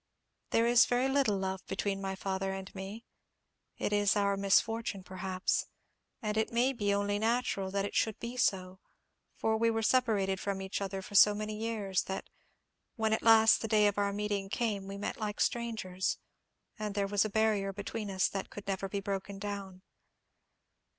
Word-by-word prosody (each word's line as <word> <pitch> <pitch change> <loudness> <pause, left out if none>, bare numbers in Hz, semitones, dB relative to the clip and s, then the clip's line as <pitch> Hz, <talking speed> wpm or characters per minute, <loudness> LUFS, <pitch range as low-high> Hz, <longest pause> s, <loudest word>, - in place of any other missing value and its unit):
There 230 - +3
is 240 0 +6
very 245 +2 +2
little 265 -7 +2
love 190 0 -3
between 195 0 -2
my 195 0 -3
father 190 0 -2
and 190 0 -7
me. 195 +4 -7 0.7
It 205 - -1
is 205 0 +3
our 200 -1 +2
misfortune, 200 +1 +1
perhaps: 185 0 -2 0.6
and 210 0 -1
it 220 - +1
may 245 +3 +2
be 205 -5 0
only 205 0 0
natural 220 -4 0
that 195 +1 -1
it - - -5
should 220 -2 +1
be 235 +1 -5
so, 190 -6 0 0.6
for 220 0 +1
we 230 +1 +3
were 225 0 0
separated 215 -6 +2
from 200 -1 -2
each 190 +1 -4
other 195 -1 -3
for 205 - -11
so 205 +1 +7
many 215 0 -4
years, 210 -4 -1
that, 190 - -5 0.6
when 220 -2 +1
at 220 - +1
last 225 -1 +6
the 225 - -2
day 215 -1 +4
of 205 0 +2
our 200 0 +1
meeting 205 -1 -2
came, 205 -3 -1
we 195 0 -6
met 205 - -4
like 210 -1 -3
strangers, 220 -6 -1 0.6
and 210 -1 -3
there 200 -1 +1
was 200 0 +2
a 215 - -2
barrier 210 -2 +1
between 205 +2 -5
us 190 -1 +2
that 195 -1 -5
could 205 - -9
never 195 0 -2
be 200 0 -3
broken 195 0 -4
down. 195 -2 -6
205 Hz, 185 wpm, -31 LUFS, 195-220 Hz, 0.7 s, so